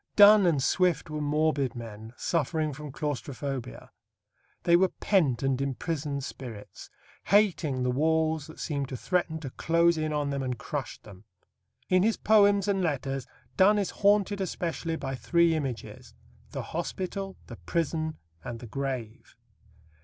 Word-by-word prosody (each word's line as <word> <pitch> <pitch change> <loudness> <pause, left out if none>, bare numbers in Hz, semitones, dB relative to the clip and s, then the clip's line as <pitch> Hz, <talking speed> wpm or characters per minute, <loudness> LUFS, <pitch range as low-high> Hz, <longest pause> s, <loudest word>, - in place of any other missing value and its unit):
Donne 205 -2 +8
and 145 -6 +2
Swift 180 -2 +1
were 150 0 -3
morbid 145 -3 +1
men 110 -2 -8
suffering 155 -1 0
from 150 +1 -8
claustrophobia. 135 - -5 0.7
They 170 - +5
were 190 +2 +5
pent 155 - +1
and 135 -1 +1
imprisoned 140 +1 -2
spirits, 120 -6 -9 0.4
hating 175 -10 +2
the 125 - +1
walls 160 +2 +1
that 160 - -12
seemed 140 -3 -2
to 130 - -5
threaten 170 +1 -1
to 135 -5 -6
close 170 +2 +2
in 155 0 -1
on 145 -1 -1
them 140 -1 -2
and 125 -2 -2
crush 140 -6 -5
them. 100 -1 -14 0.6
In 185 0 +4
his 220 +3 +2
poems 205 -2 +4
and 195 -1 +1
letters 135 -5 -2 0.3
Donne 205 +3 +6
is 200 -2 0
haunted 205 -1 +2
especially 165 -2 -2
by 135 -4 -4
three 170 +5 +2
images 135 -7 -5 0.3
the - - -5
hospital, 195 +1 -4
the - - -10
prison, 160 -1 -2 0.3
and 120 -1 -6
the 120 - -9
grave. 125 -2 -5
155 Hz, 145 wpm, -28 LUFS, 135-175 Hz, 0.7 s, Donne